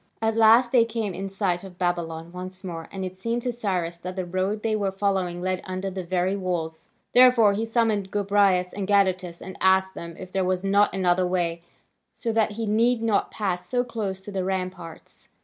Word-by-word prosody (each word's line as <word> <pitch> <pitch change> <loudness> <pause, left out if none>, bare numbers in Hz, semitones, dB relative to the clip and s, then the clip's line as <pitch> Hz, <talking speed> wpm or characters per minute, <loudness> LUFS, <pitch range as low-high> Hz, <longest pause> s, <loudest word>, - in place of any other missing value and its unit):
At 225 0 0
last 230 +2 +6
they 245 -3 +6
came 225 -3 -3
in 195 +2 -5
sight 190 -2 -1
of 185 -2 -11
Babylon 170 -2 -2
once 185 +1 -8
more, 165 -3 -6
and 190 -1 -4
it 185 0 -6
seemed 230 +5 -2
to 250 - 0
Cyrus 180 -7 -2
that 185 +1 -6
the 185 -1 -3
road 185 +4 -2
they 220 -1 +1
were 200 -2 0
following 190 -3 -1
led 185 0 -1
under 185 +1 -4
the 190 0 -5
very 185 +2 0
walls. 170 -4 -4 0.2
Therefore 245 -4 +6
he 220 +3 -2
summoned 225 -4 +1
Gobryas 200 -3 +2
and 195 -1 -4
Gadatas, 185 -4 +1
and 190 - -8
asked 190 0 +3
them 170 -1 -8
if 185 0 -9
there 190 0 0
was 185 0 0
not 200 +1 +4
another 180 -1 +2
way, 170 -2 -1 0.5
so 230 - -2
that 220 -1 +1
he 225 +1 -3
need 230 +3 +2
not 220 -3 +1
pass 185 -4 -3
so 245 -1 +1
close 210 -6 -4
to 205 - -8
the 190 -2 -2
ramparts. 185 -3 -5
190 Hz, 200 wpm, -25 LUFS, 180-210 Hz, 0.5 s, last